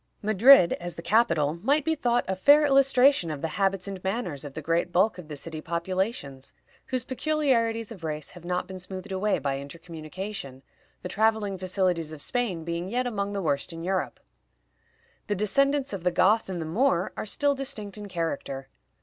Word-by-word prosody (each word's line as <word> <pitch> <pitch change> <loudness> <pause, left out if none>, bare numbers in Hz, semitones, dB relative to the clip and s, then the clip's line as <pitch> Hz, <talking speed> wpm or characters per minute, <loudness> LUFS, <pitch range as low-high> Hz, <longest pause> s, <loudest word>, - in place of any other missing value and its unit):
Madrid, 215 -1 +7
as 175 -1 -6
the 165 - -7
capital, 170 -8 +2
might 285 +5 +2
be 320 - +2
thought 245 -5 +1
a 190 - -1
fair 290 +10 +6
illustration 275 - +4
of 150 -1 -5
the 165 - 0
habits 195 +2 0
and 195 -2 -6
manners 190 - -2
of 145 -2 -8
the 155 - -4
great 170 +3 0
bulk 185 +3 +2
of 170 - -10
the 150 - -6
city 155 +2 -6
populations, 170 - -3 0.3
whose 255 -2 -2
peculiarities 255 -6 0
of 190 -7 -10
race 155 -2 -4
have 175 - -13
not 180 +1 -2
been 190 -1 -8
smoothed 185 +2 -7
away 200 +2 +1
by 135 -1 -2
intercommunication, 160 -1 -7 0.4
the - - -3
traveling 215 0 +1
facilities 185 -3 -1
of 155 - -8
Spain 220 -10 -1
being 170 +2 -3
yet 250 +3 0
among 205 -4 -2
the 200 -1 -2
worst 140 0 -1
in 165 0 -7
Europe. 185 +1 -2 1.1
The 205 - 0
descendants 275 +6 +1
of 190 -4 -5
the 180 - +3
Goth 200 +5 +3
and 180 -2 -3
the 160 - -3
Moor 180 +1 +1
are - - -5
still 285 +6 +1
distinct 220 -7 -5
in 210 -1 -7
character. 145 -6 -4
190 Hz, 185 wpm, -27 LUFS, 165-230 Hz, 1.1 s, Madrid